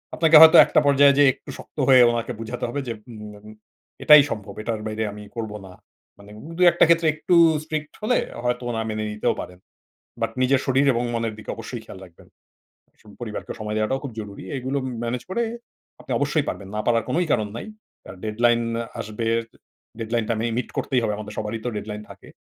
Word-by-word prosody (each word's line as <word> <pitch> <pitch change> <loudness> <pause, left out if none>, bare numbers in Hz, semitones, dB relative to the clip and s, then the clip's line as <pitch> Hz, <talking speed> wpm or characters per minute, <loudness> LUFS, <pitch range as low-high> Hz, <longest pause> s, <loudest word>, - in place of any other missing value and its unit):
আপনাকে 160 -1 +4
হয়তো 160 0 +9
একটা - - +3
পর্যায়ে 140 0 +6
যে - - +7
একটু - - -17
শক্ত - - -15
হয়ে 130 -2 +7
ওনাকে 115 -1 -3
বুঝাতে 115 +2 -6
হবে 145 - -3
যে 115 - -2 0.2
উম 105 -2 -9
এম 105 - -20 0.6
"এটাই 150 -1 +9
সম্ভব। 105 -4 -6
এটার 110 -1 -3
বাইরে 110 +1 -3
আমি 105 0 -10
করব 110 -2 -4
না।" 95 - -12 0.5
মানে 100 +1 -15
উব 150 - -11
দুয়েকটা 175 -1 +6
ক্ষেত্রে 170 -1 +4
একটু 155 +3 +1 0.3
strict 155 -1 -5
হলে 220 +4 +1 0.3
হয়তো 125 0 -1
ওরা 115 -1 -2
মেনে 110 0 -3
নিতেও 105 - 0
পারেন। 90 0 -11 0.6
বাট 115 - 0
নিজের 130 +1 +3
শরীর 135 +1 +2
এবং 120 - -1
মনের 115 -1 -2
দিকে 110 - -11
অবশ্যই 115 +1 -7
খেয়াল 95 - -11
রাখবেন। 85 -2 -20 0.7
স - - -24 0.2
পরিবারকে 110 -3 -6
সময় 105 0 -4
দেওয়াটাও 110 +5 -1
খুব 135 - -6
জরুরি। 100 -3 -9
এইগুলো 130 +2 -2
ম - - -3
ম্যানেজ 120 +1 -3
করে 235 +5 0 0.6
আপনি - - -6
অবশ্যই - - 0
পারবেন, 95 - -5
না - - -1
পারার 115 -2 +2
কোনোই 175 +1 0
কারণ 110 -3 0
নাই। - - -7 0.4
আর - - -9
deadline 115 +2 +2 0.4
আসবে, 110 +1 -5 0.7
deadline 115 0 -2
টা 115 - +1
মে 115 - -1
মিট 125 - -2
করতেই 130 -2 0
হবে। 110 -2 0
আমাদের 105 0 -8
সবারই 110 +1 -4
তো 125 - -1
deadline 105 0 -6
থাকে। - - -14
115 Hz, 200 wpm, -23 LUFS, 110-135 Hz, 0.7 s, হয়তো